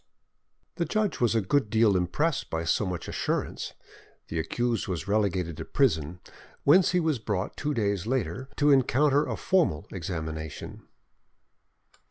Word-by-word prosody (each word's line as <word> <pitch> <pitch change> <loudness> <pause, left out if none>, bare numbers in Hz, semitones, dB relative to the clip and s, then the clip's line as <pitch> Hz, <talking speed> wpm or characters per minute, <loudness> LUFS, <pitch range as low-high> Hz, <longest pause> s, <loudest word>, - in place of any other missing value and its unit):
The 170 - 0
judge 215 +1 -1
was 120 -2 +2
a 110 - +3
good 110 +4 +1
deal 110 -2 +4
impressed 135 - 0
by 80 0 -2
so 95 +5 +1
much 90 -2 -4
assurance. - - -2 0.6
The 80 - -2
accused 115 +9 -1
was 90 -2 -3
relegated 95 -6 0
to 80 - -6
prison, 90 - 0 0.4
whence 175 +6 +6
he 180 - +2
was 160 -6 0
brought 105 -3 -3
two 150 0 -2
days 100 -3 0
later 125 0 -2
to 145 0 +4
encounter 140 +2 +3
a - - -3
formal 110 - +1
examination. 80 -4 -6
105 Hz, 145 wpm, -27 LUFS, 85-140 Hz, 0.6 s, whence